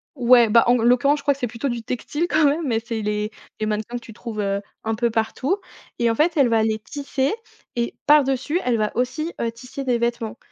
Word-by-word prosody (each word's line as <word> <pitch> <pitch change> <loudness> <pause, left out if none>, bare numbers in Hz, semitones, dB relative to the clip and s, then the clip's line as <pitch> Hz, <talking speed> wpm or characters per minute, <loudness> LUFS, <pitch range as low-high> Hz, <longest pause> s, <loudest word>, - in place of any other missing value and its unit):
Ouais, 245 -2 +6
bah, 230 +2 +5
en 245 - +5
g 225 - -1
l'occurrence, 275 +4 +4
je - - -12
crois 285 - +3
que 275 - -15
c'est 245 - -1
plutôt 235 +5 -3
du 240 -2 -3
textile, 295 +8 -3
quand 310 -1 +3
même, 295 +1 +1
mais 225 -2 +1
c'est 230 -1 -4
les 210 +1 -2 0.3
les 215 - -1
mannequins 215 +3 -3
que 240 - -9
tu 225 - -12
trouves, 220 -1 -7
heu, 200 0 -1 0.2
un 225 0 -1
peu 235 +1 +1
partout 230 - -1 0.4
et 235 -1 +2
en 225 - -1
fait, 320 +5 +2
elle 265 -4 +5
va 225 -1 +3
les 220 0 +1
tisser 275 - -2 0.4
et 235 0 -2
par-dessus, 295 +2 +3
elle 245 -2 +1
va 215 -1 0
aussi, 305 +7 -1
heu, 230 - 0
tisser 250 +4 -8
des 250 -2 +1
vêtements 235 -1 -2
240 Hz, 240 wpm, -22 LUFS, 225-275 Hz, 0.4 s, Ouais